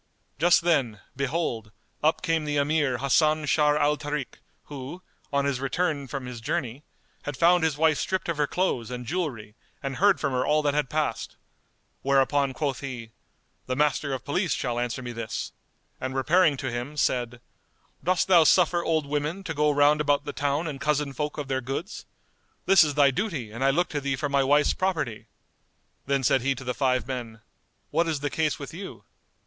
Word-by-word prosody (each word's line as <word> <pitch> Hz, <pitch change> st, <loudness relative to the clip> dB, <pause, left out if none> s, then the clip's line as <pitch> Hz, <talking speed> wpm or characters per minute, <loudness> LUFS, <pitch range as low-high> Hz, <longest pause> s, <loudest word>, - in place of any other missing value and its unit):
Just 175 Hz, +3 st, +5 dB
then, 135 Hz, -11 st, +1 dB, 0.2 s
behold, 140 Hz, -7 st, -2 dB, 0.3 s
up 155 Hz, +1 st, +2 dB
came 165 Hz, -2 st, +1 dB
the 150 Hz, -1 st, -1 dB
Emir 145 Hz, -3 st, +1 dB
Hasan 155 Hz, +4 st, +2 dB
Sharr 150 Hz, 0 st, +3 dB
al 150 Hz, 0 st, +2 dB
Tarik 145 Hz, -2 st, -5 dB, 0.2 s
who, 145 Hz, +5 st, -8 dB, 0.3 s
on 140 Hz, 0 st, +1 dB
his 140 Hz, -3 st, 0 dB
return 140 Hz, +1 st, -1 dB
from 135 Hz, -1 st, -5 dB
his 125 Hz, -2 st, -7 dB
journey, 135 Hz, 0 st, -3 dB, 0.4 s
had 145 Hz, -, -5 dB
found 175 Hz, 0 st, +4 dB
his 160 Hz, -3 st, +1 dB
wife 155 Hz, -1 st, +3 dB
stripped 185 Hz, 0 st, -2 dB
of 170 Hz, -3 st, -2 dB
her 150 Hz, -1 st, +1 dB
clothes 140 Hz, -12 st, -1 dB
and 125 Hz, -1 st, -6 dB
jewellery 125 Hz, -10 st, -3 dB, 0.3 s
and 135 Hz, -1 st, -3 dB
heard 200 Hz, 0 st, +4 dB
from 140 Hz, -3 st, -1 dB
her 125 Hz, 0 st, +1 dB
all 150 Hz, +2 st, +2 dB
that 145 Hz, -1 st, +1 dB
had 150 Hz, -3 st, 0 dB
passed; 150 Hz, -7 st, -2 dB, 0.7 s
whereupon 140 Hz, 0 st, +2 dB
quoth 135 Hz, -1 st, -2 dB
he, 125 Hz, -5 st, -7 dB, 0.6 s
"The 130 Hz, -, -1 dB
Master 145 Hz, 0 st, +1 dB
of 130 Hz, -, -4 dB
Police 180 Hz, +5 st, 0 dB
shall 120 Hz, -2 st, -2 dB
answer 120 Hz, +1 st, -3 dB
me 120 Hz, -, -5 dB
this" 115 Hz, -2 st, -5 dB, 0.5 s
and 130 Hz, 0 st, -4 dB
repairing 155 Hz, +2 st, +3 dB
to 130 Hz, -1 st, -3 dB
him, 125 Hz, +5 st, -5 dB
said, 125 Hz, -3 st, 0 dB, 0.6 s
"Dost 185 Hz, +1 st, +1 dB
thou 175 Hz, -4 st, +7 dB
suffer 175 Hz, +1 st, +4 dB
old 160 Hz, -3 st, +1 dB
women 150 Hz, +6 st, -2 dB
to 165 Hz, -, -4 dB
go 150 Hz, 0 st, +2 dB
round 145 Hz, +1 st, +4 dB
about 145 Hz, -1 st, +1 dB
the -, -, -5 dB
town 145 Hz, +3 st, -1 dB
and 140 Hz, -4 st, -5 dB
cozen 150 Hz, -2 st, 0 dB
folk 150 Hz, +3 st, -3 dB
of 145 Hz, -2 st, -4 dB
their 130 Hz, -1 st, -1 dB
goods? 135 Hz, -, -5 dB, 0.6 s
This 190 Hz, -2 st, +7 dB
is 145 Hz, -2 st, -1 dB
thy 140 Hz, -2 st, +5 dB
duty 135 Hz, -, -3 dB
and 120 Hz, +4 st, -4 dB
I 135 Hz, -, +4 dB
look 175 Hz, +6 st, +1 dB
to 145 Hz, -, -3 dB
thee 140 Hz, -1 st, -1 dB
for 145 Hz, +2 st, -2 dB
my 140 Hz, 0 st, +2 dB
wife's 145 Hz, +2 st, +3 dB
property." 155 Hz, -, -2 dB, 0.8 s
Then 140 Hz, -1 st, +1 dB
said 130 Hz, +1 st, +3 dB
he 135 Hz, +2 st, 0 dB
to 130 Hz, -, -8 dB
the 125 Hz, 0 st, -2 dB
five 130 Hz, -1 st, +1 dB
men, 120 Hz, -4 st, -6 dB, 0.5 s
"What 170 Hz, -, +2 dB
is 155 Hz, -4 st, -2 dB
the 145 Hz, -, -2 dB
case 155 Hz, -2 st, 0 dB
with 140 Hz, 0 st, -8 dB
you?" 190 Hz, +3 st, -8 dB
145 Hz, 195 wpm, -26 LUFS, 130-155 Hz, 0.8 s, thou